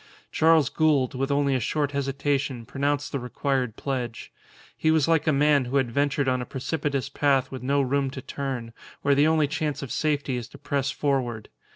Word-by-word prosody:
Charles 160 Hz, -4 st, +4 dB
Gould, 150 Hz, -6 st, +2 dB
with 135 Hz, +1 st, -2 dB
only 140 Hz, -1 st, +2 dB
a 130 Hz, -, +1 dB
short 145 Hz, +4 st, -1 dB
hesitation, 140 Hz, -2 st, -1 dB
pronounced 145 Hz, +2 st, -1 dB
the 140 Hz, -, -2 dB
required 125 Hz, -1 st, -2 dB
pledge. 125 Hz, -4 st, -4 dB, 0.4 s
He 155 Hz, -, +1 dB
was 160 Hz, -3 st, +3 dB
like 165 Hz, -2 st, +2 dB
a -, -, +5 dB
man 145 Hz, -1 st, +3 dB
who 130 Hz, +3 st, 0 dB
had 130 Hz, -3 st, +1 dB
ventured 140 Hz, +1 st, +1 dB
on 130 Hz, -1 st, +1 dB
a -, -, -4 dB
precipitous 140 Hz, -1 st, -2 dB
path 140 Hz, -3 st, +1 dB
with 130 Hz, -2 st, -6 dB
no 140 Hz, +2 st, +1 dB
room 135 Hz, +1 st, 0 dB
to 130 Hz, 0 st, -7 dB
turn, 135 Hz, -5 st, -4 dB, 0.3 s
where 140 Hz, -, +4 dB
the 145 Hz, +2 st, +4 dB
only 155 Hz, -2 st, +3 dB
chance 150 Hz, -1 st, -2 dB
of 135 Hz, -, -6 dB
safety 145 Hz, -4 st, 0 dB
is 120 Hz, -1 st, -5 dB
to -, -, -14 dB
press 140 Hz, -1 st, -1 dB
forward. 130 Hz, -7 st, -1 dB
140 Hz, 195 wpm, -25 LUFS, 130-145 Hz, 0.4 s, a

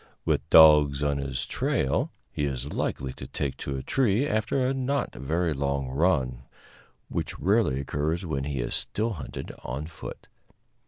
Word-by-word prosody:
With -, -, 0 dB
dogs 75 Hz, -3 st, +7 dB
on 70 Hz, -1 st, +1 dB
his 65 Hz, -2 st, -2 dB
trail 65 Hz, -, 0 dB, 0.2 s
he 75 Hz, -, -1 dB
is 70 Hz, 0 st, -3 dB
likely 65 Hz, -1 st, -2 dB
to -, -, -9 dB
take 70 Hz, -2 st, -3 dB
to 70 Hz, -1 st, -4 dB
a 65 Hz, -, -5 dB
tree 125 Hz, -1 st, +2 dB
after 110 Hz, +4 st, 0 dB
a 130 Hz, -, +1 dB
not 135 Hz, +1 st, -1 dB
very 80 Hz, +4 st, -1 dB
long 70 Hz, -1 st, -1 dB
run, 65 Hz, -4 st, +1 dB, 0.7 s
which -, -, -3 dB
rarely 95 Hz, -, +2 dB
occurs 75 Hz, +6 st, -2 dB
when 70 Hz, -4 st, -2 dB
he 70 Hz, -3 st, -2 dB
is -, -, -3 dB
still 110 Hz, +2 st, 0 dB
hunted -, -, -6 dB
on 65 Hz, +5 st, -4 dB
foot. 80 Hz, -, -9 dB
75 Hz, 160 wpm, -27 LUFS, 70-95 Hz, 0.7 s, dogs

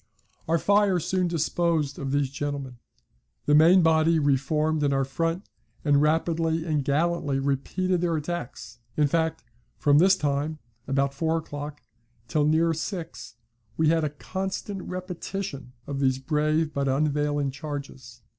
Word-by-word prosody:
Our 165 Hz, +1 st, +3 dB
fire 200 Hz, 0 st, +3 dB
soon 180 Hz, +2 st, 0 dB
disposed 165 Hz, -2 st, 0 dB
of 135 Hz, -1 st, -3 dB
these 140 Hz, -2 st, 0 dB
gentlemen. 140 Hz, -3 st, -4 dB, 0.7 s
The 145 Hz, -, +3 dB
main 170 Hz, +4 st, +7 dB
body 160 Hz, 0 st, +4 dB
re 145 Hz, -3 st, +3 dB
formed 150 Hz, +3 st, 0 dB
in 145 Hz, -1 st, +2 dB
our 135 Hz, -1 st, +1 dB
front, 165 Hz, +7 st, -2 dB, 0.4 s
and 145 Hz, -1 st, +4 dB
rapidly 160 Hz, +1 st, +1 dB
and 150 Hz, -4 st, 0 dB
gallantly 145 Hz, 0 st, 0 dB
repeated 155 Hz, +7 st, 0 dB
their 170 Hz, -2 st, +1 dB
attacks, 150 Hz, -7 st, -5 dB, 0.2 s
In 150 Hz, -, +4 dB
fact, 160 Hz, +2 st, 0 dB, 0.3 s
from 145 Hz, 0 st, +4 dB
this 190 Hz, +3 st, +6 dB
time 150 Hz, -1 st, -1 dB, 0.3 s
(about 140 Hz, +1 st, +1 dB
four 160 Hz, +3 st, 0 dB
o'clock) 145 Hz, -2 st, -7 dB, 0.4 s
till 150 Hz, +2 st, +1 dB
near 165 Hz, +2 st, +3 dB
six, 165 Hz, -, -6 dB, 0.4 s
we 160 Hz, -1 st, +3 dB
had 165 Hz, 0 st, +2 dB
a 150 Hz, -, 0 dB
constant 190 Hz, +5 st, -5 dB
repetition 180 Hz, -7 st, -6 dB
of 140 Hz, -1 st, -4 dB
these 130 Hz, -2 st, +2 dB
brave 155 Hz, +2 st, 0 dB
but 140 Hz, 0 st, -1 dB
unavailing 145 Hz, 0 st, +1 dB
charges. 135 Hz, -4 st, -8 dB
155 Hz, 145 wpm, -26 LUFS, 140-165 Hz, 0.7 s, main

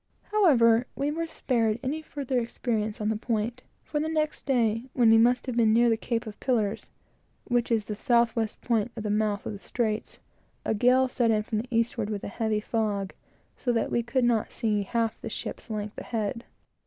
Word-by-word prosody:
However, 250 Hz, -, +5 dB
we 285 Hz, +1 st, -1 dB
were 330 Hz, +2 st, -2 dB
spared 230 Hz, -7 st, 0 dB
any 290 Hz, +4 st, -2 dB
further 275 Hz, -4 st, -2 dB
experience 225 Hz, -2 st, -2 dB
on 210 Hz, 0 st, 0 dB
the 220 Hz, -, +1 dB
point; 230 Hz, +2 st, -2 dB, 0.2 s
for 300 Hz, -, -2 dB
the 310 Hz, +1 st, -1 dB
next 310 Hz, -1 st, -1 dB
day, 230 Hz, -3 st, +2 dB
when 235 Hz, -3 st, +5 dB
we 225 Hz, -, +7 dB
must 245 Hz, +2 st, +3 dB
have 255 Hz, -3 st, -3 dB
been 225 Hz, -2 st, +4 dB
near 235 Hz, +1 st, +5 dB
the -, -, +4 dB
Cape 230 Hz, +1 st, -2 dB
of 215 Hz, -1 st, -9 dB
Pillars, 220 Hz, -6 st, 0 dB, 0.5 s
which 240 Hz, -1 st, 0 dB
is 220 Hz, -3 st, +2 dB
the 210 Hz, -, -4 dB
south 235 Hz, 0 st, +2 dB
west 225 Hz, -2 st, -2 dB
point 230 Hz, -1 st, 0 dB
of 220 Hz, -, -5 dB
the 210 Hz, -, -1 dB
mouth 210 Hz, -1 st, 0 dB
of -, -, -3 dB
the 200 Hz, -, -8 dB
straits, 220 Hz, 0 st, -2 dB, 0.5 s
a -, -, +1 dB
gale 250 Hz, +4 st, +4 dB
set 245 Hz, -2 st, +1 dB
in 215 Hz, -1 st, +2 dB
from 215 Hz, -1 st, -2 dB
the 235 Hz, -, -5 dB
eastward, 230 Hz, -2 st, 0 dB
with 205 Hz, -2 st, -4 dB
a -, -, -4 dB
heavy 220 Hz, 0 st, -1 dB
fog, 205 Hz, -3 st, -1 dB, 0.4 s
so 245 Hz, -, -1 dB
that 230 Hz, -, 0 dB
we 235 Hz, -, +2 dB
could 245 Hz, +2 st, 0 dB
not 230 Hz, -3 st, +1 dB
see 210 Hz, -2 st, 0 dB
half 225 Hz, +3 st, -1 dB
of -, -, -28 dB
the -, -, -5 dB
ship's -, -, -6 dB
length 210 Hz, -1 st, -4 dB
ahead. 230 Hz, +1 st, -3 dB
230 Hz, 210 wpm, -27 LUFS, 215-245 Hz, 0.5 s, we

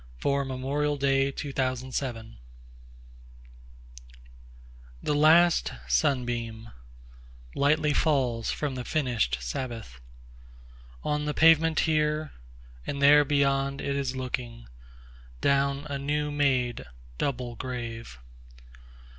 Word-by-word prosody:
Dirge 140 Hz, -, 0 dB
for 140 Hz, +3 st, -1 dB, 0.4 s
Two 140 Hz, 0 st, -6 dB
Veterans 130 Hz, 0 st, -1 dB
1THE 115 Hz, -, -6 dB, 2.7 s
LAST 160 Hz, +4 st, +4 dB
sunbeamLightly 110 Hz, -, -2 dB
falls 125 Hz, -7 st, +1 dB
from 145 Hz, -3 st, -2 dB
the 125 Hz, -1 st, -5 dB
finish'd 120 Hz, -, 0 dB
Sabbath, 105 Hz, -, -6 dB, 1.0 s
On 150 Hz, 0 st, -1 dB
the 150 Hz, -, -2 dB
pavement 165 Hz, 0 st, +5 dB
here—and 140 Hz, -, -3 dB
there 145 Hz, +1 st, +7 dB
beyond, 140 Hz, -1 st, +1 dB
it 140 Hz, -, -2 dB
is 135 Hz, -2 st, -2 dB
looking, 125 Hz, -, -5 dB, 0.7 s
Down 140 Hz, -, +1 dB
a 140 Hz, -1 st, -4 dB
new 150 Hz, +1 st, -1 dB
made 130 Hz, -5 st, 0 dB, 0.4 s
double 125 Hz, -3 st, -2 dB
grave. 115 Hz, -, -6 dB
135 Hz, 85 wpm, -27 LUFS, 115-145 Hz, 2.7 s, there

